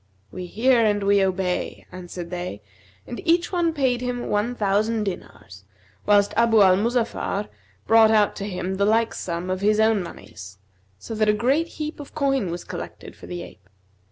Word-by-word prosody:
'We 180 -1 -6
hear 235 +5 +3
and 205 -2 +1
we 200 0 +4
obey,' 185 -1 -2
answered 175 -1 -8
they; 175 - -5 0.4
and 240 - -7
each 340 0 +2
one 345 -3 +1
paid 260 -5 0
him 245 -1 -3
one 210 +4 0
thousand 215 +1 +1
dinars, 100 - -7 0.4
whilst 205 -1 +4
Abu 230 -1 +4
al 185 -1 +6
Muzaffar 225 -1 -1 0.4
brought 225 0 +6
out 215 -2 +3
to 200 - -4
him 185 0 -3
the 200 - +2
like 225 +2 +2
sum 175 +1 -4
of 185 0 -2
his 210 +1 +2
own 220 -2 +3
monies, 100 - -10 0.4
so 225 - -8
that 215 -1 +1
a - - +5
great 265 +10 +1
heap 305 0 -5
of 285 - -10
coin 275 - 0
was 175 +1 -5
collected - - -8
for - - -13
the 175 -1 -5
ape. - - -15
210 Hz, 180 wpm, -23 LUFS, 185-235 Hz, 0.4 s, al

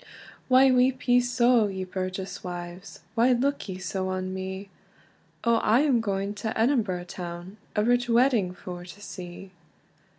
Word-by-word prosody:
"Why 260 +1 +6
weep 255 +1 +2
ye 245 0 +6
so, 245 -2 +3
ye 190 -1 -4
burgess 185 +2 -5
wives, 175 0 -7
Why 235 +3 +4
look 270 -1 -1
ye 185 - -4
so 190 0 -3
on 185 0 -3
me? 190 +1 -5 0.7
O, 235 -1 +4
I 225 +3 +3
am 270 -6 +3
going 200 -1 -2
to 220 0 -2
Edinburgh 225 -8 +1
town, 175 +2 -7 0.2
A 210 - +2
rich 245 +1 +2
wedding 235 -5 +3
for 180 -1 -8
to 180 +3 -12
see!" 185 -1 -9
200 Hz, 155 wpm, -27 LUFS, 185-245 Hz, 0.7 s, Why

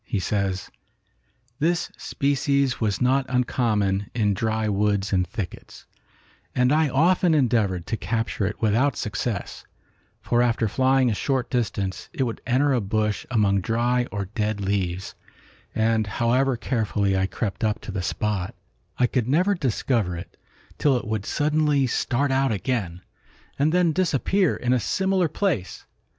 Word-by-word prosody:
He 105 - -3
says, 95 0 -2 0.9
"This 170 +3 0
species 140 -2 0
was 105 0 0
not 130 +1 +2
uncommon 110 -6 0
in 105 -4 +2
dry 110 +2 -1
woods 100 -1 0
and 90 -1 +2
thickets, 90 +1 -7 0.7
and 125 0 +3
I 155 -1 +3
often 170 +5 +3
endeavored 110 - +1
to 115 - -2
capture 115 -3 -1
it 105 - -5
without 115 +6 +2
success, 105 -1 -3 0.6
for 120 0 +1
after 120 -2 +1
flying 130 +2 +2
a - - +1
short 130 +3 -1
distance 100 -6 -2
it 135 - 0
would 115 -3 -3
enter 135 +3 +3
a 125 - +1
bush 105 +1 -1
among 100 -5 +2
dry 120 +4 +1
or 100 -1 -3
dead 105 +1 -2
leaves, 95 -2 -2 0.6
and 110 -1 +2
however 120 +5 +1
carefully 105 -5 0
I 95 0 +1
crept 105 +1 -4
up 110 0 +1
to - - -7
the 95 -1 -3
spot, 100 0 -2 0.4
I 125 - +4
could 125 -1 0
never 180 +9 +3
discover 120 - 0
it 85 - -9 0.4
till 140 -4 +3
it 120 - -5
would 110 -2 -3
suddenly 150 -2 +2
start 130 +2 0
out 135 -1 +2
again, 100 -5 -2 0.6
and 150 +3 +3
then 175 -1 +3
disappear 185 +2 +1
in 125 0 0
a 125 - +3
similar 190 - +1
place. 155 - -2
115 Hz, 150 wpm, -24 LUFS, 100-135 Hz, 0.9 s, I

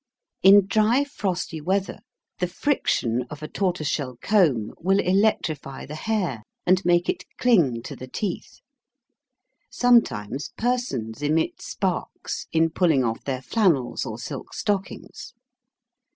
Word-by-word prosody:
In 195 +1 +8
dry 220 +6 +3
frosty 185 - -3
weather 190 +4 -1 0.4
the 180 - +1
friction 175 - 0
of 150 0 -9
a - - -4
tortoise 180 -6 -1
shell 130 -4 -2
comb 150 - +2
will 190 +3 +2
electrify 180 -8 0
the 145 - -8
hair 175 - -2 0.2
and 185 +1 +3
make 175 0 +3
it - - -1
cling 160 - +3
to - - -7
the 130 - -9
teeth. 185 +7 -5 1.1
Sometimes 145 - +2
persons 220 - -2
emit 155 +2 0
sparks 190 -3 -3
in 165 0 +2
pulling 160 -5 +3
off 115 -1 -2
their 130 -2 -3
flannels 170 - +1
or - - -5
silk - - -7
stockings. 200 -2 -4
175 Hz, 125 wpm, -24 LUFS, 135-200 Hz, 1.1 s, In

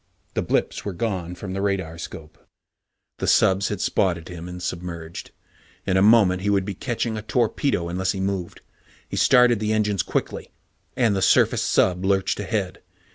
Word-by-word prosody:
The - - 0
blips - - -1
were 100 - -4
gone 90 -3 -3
from 95 +2 -7
the 95 - -3
radar 95 -5 -2
scope. 80 -2 -9 0.8
The - - -2
subs 95 +1 +3
had 105 - -3
spotted 85 -4 0
him 90 0 -8
and 90 0 -7
submerged. 85 -2 -6 0.6
In 95 - 0
a 95 - +4
moment 100 -4 +5
he 100 - -1
would 100 -2 +2
be 100 - -4
catching 115 +2 -3
a - - -4
torpedo, 115 - 0
unless 90 +2 -1
he 95 - -5
moved. 95 -2 -3 0.5
He - - -6
started 125 -3 +5
the 110 0 0
engines 105 -3 +1
quickly, - - -3 0.5
and 115 -6 +3
the 95 - -1
surfaced - - +3
sub 90 0 +2
lurched 95 0 +1
ahead. 95 -2 -3
95 Hz, 175 wpm, -23 LUFS, 90-105 Hz, 0.8 s, moment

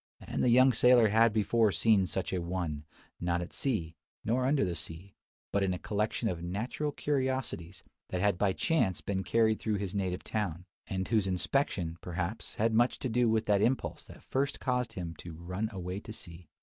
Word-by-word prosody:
And - - -4
the 125 - +4
young 130 +2 +6
sailor 125 -3 +6
had 115 +2 +5
before 110 0 +3
seen 95 +2 +3
such 95 +1 -3
a 90 - 0
one; 85 -4 -3 0.3
not 85 0 0
at 85 - -6
sea, 100 - -1 0.3
nor 125 +4 +1
under 140 -5 +3
the 90 - -2
sea, 85 +4 -7 0.4
but 100 - +1
in 95 -2 +1
a - - -4
collection 105 +3 -1
of 85 -5 -2
"natural 110 - -2
curiosities," 130 - -2 0.3
that 90 - -2
had 100 -1 +2
by 100 -2 +3
chance 110 - +1
been 95 -1 -2
carried 110 +1 +2
through 110 -2 -1
his 95 -2 -3
native 95 -2 -2
town; 95 -5 -3 0.2
and 95 0 -2
whose 110 -4 +2
inspection, 90 - 0
perhaps, 90 +5 -4
had 110 +1 +1
much 120 +3 +3
to 130 - -3
do 120 0 +3
with 110 0 +1
that 100 -1 +3
impulse 130 +4 0
that - - -14
first 140 +2 -1
caused 125 -2 -1
him 85 -3 -5
to 85 - -8
"run 90 +6 -3
away 95 -1 -4
to 110 - -10
sea." 85 -5 -11
100 Hz, 195 wpm, -31 LUFS, 90-115 Hz, 0.4 s, young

